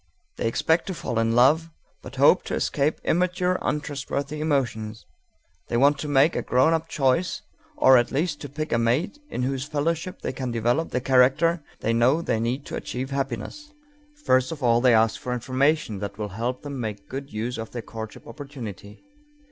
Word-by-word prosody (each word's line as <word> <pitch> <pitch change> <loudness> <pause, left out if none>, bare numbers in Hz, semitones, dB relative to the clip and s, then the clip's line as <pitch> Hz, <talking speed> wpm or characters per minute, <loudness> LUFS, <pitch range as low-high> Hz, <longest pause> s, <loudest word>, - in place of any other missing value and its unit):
They - - -1
expect 160 +8 +1
to 190 - -3
fall 120 -7 -2
in 115 0 +1
love, 150 +7 +4 0.3
but - - -10
hope - - +5
to - - -2
escape 145 +3 0
immature, 180 +1 +1
untrustworthy 145 0 -3
emotions. 120 -8 -1 0.6
They 120 - -1
want 140 +3 +4
to 150 - -4
make 145 +3 +4
a - - 0
grown 130 +6 +3
up 165 0 -1
choice 135 +5 0 0.3
or 130 -1 +7
at 120 - -1
least 150 +2 -1
to 145 - -6
pick 155 +3 -5
a 115 - +3
mate 140 - 0
in 125 - -3
whose 135 +1 -2
fellowship 160 +5 -2
they - - -2
can 130 -2 -4
develop 120 +7 0
the 125 - -1
character 135 +6 +3 0.2
they 115 - +1
know 130 +8 +3
they 110 - 0
need 125 +5 -2
to - - -6
achieve 130 +2 -5
happiness. 135 - -4 0.5
First 130 0 +3
of 150 -4 -6
all 120 -1 +4
they 125 -2 +5
ask 110 0 +2
for 125 - -3
information 130 -2 0
that 100 0 -5
will 105 -1 -4
help 120 +6 -3
them 140 -2 -5
make 105 -4 -5
good 135 +1 -6
use 115 +3 -3
of 110 - -5
their 120 -2 -6
courtship 110 -1 -8
opportunity. 115 - -9
130 Hz, 190 wpm, -25 LUFS, 115-150 Hz, 0.6 s, or